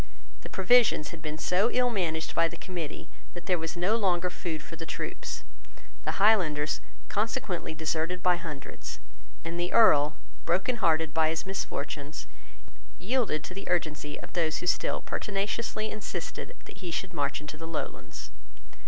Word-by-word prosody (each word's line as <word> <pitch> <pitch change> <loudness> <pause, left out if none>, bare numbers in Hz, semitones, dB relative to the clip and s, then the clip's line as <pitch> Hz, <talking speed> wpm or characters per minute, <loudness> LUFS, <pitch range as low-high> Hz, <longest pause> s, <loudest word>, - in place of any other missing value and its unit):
The - - -8
provisions 200 -5 +5
had 165 - -8
been 155 -1 -3
so 185 +8 +3
ill 250 0 +3
managed 165 -6 0
by 165 - +4
the 170 +1 -7
Committee 175 -5 -5 0.3
that 175 - -7
there 180 -3 +2
was 165 +1 -3
no 185 +6 +3
longer 180 -5 +2
food 160 -4 -4
for 165 - -8
the 165 0 -7
troops. - - -4 0.6
The - - +1
Highlanders 175 -8 +4 0.3
consequently 210 -7 -1
deserted 160 +3 -1
by 180 -1 +5
hundreds; 150 -6 -6 0.5
and 170 +1 -3
the 175 +1 0
Earl, 150 -10 +6 0.3
brokenhearted 170 -4 +2
by 160 -1 +4
his 160 0 -1
misfortunes, 155 -6 -3 0.7
yielded 195 - +1
to 185 - -6
the 195 +1 -6
urgency 155 -4 0
of - - -10
those 160 -3 +1
who - - -4
still 180 - +2
pertinaciously 210 +2 -1
insisted 215 - -5
that - - -11
he 180 - -5
should 170 +2 -2
march 140 0 0
into 150 0 -7
the 165 +1 -7
Lowlands. 165 -2 -5
175 Hz, 155 wpm, -29 LUFS, 160-195 Hz, 0.7 s, Earl